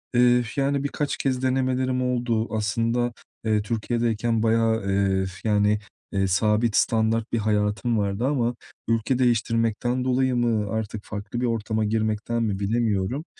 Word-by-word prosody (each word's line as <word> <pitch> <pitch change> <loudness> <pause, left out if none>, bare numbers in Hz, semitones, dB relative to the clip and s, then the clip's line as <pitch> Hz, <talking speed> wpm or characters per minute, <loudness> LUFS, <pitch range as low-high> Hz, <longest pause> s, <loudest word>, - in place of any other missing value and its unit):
Eee, 125 0 +5
yani, 140 0 0
birkaç 145 0 -2
kez 130 -2 -1
denemelerim 130 0 +1
oldu. 120 -3 0
Aslında, 115 +3 0 0.3
eee, 110 -1 +2
Türkiye’deyken 115 +1 -1
bayağı, 115 -1 +2
eee, 95 -1 +1 0.2
yani, 105 -1 +2 0.3
eee, 95 -1 +1
sabit 105 +4 +2
standart 110 0 +1
bir - - +1
hayatım 105 +2 0
vardı 100 +3 -1
ama 125 -4 0 0.3
ülke 115 +3 +1
değiştirmekten 115 0 +1
dolayı 130 0 +1
mı 115 -4 +1
artık 110 -1 -3
farklı 105 +3 -5
bir - - +1
ortama 110 -2 -1
girmekten 110 +2 -1
mi 100 -3 -1
bilemiyorum. 110 - 0
115 Hz, 135 wpm, -24 LUFS, 105-120 Hz, 0.3 s, Eee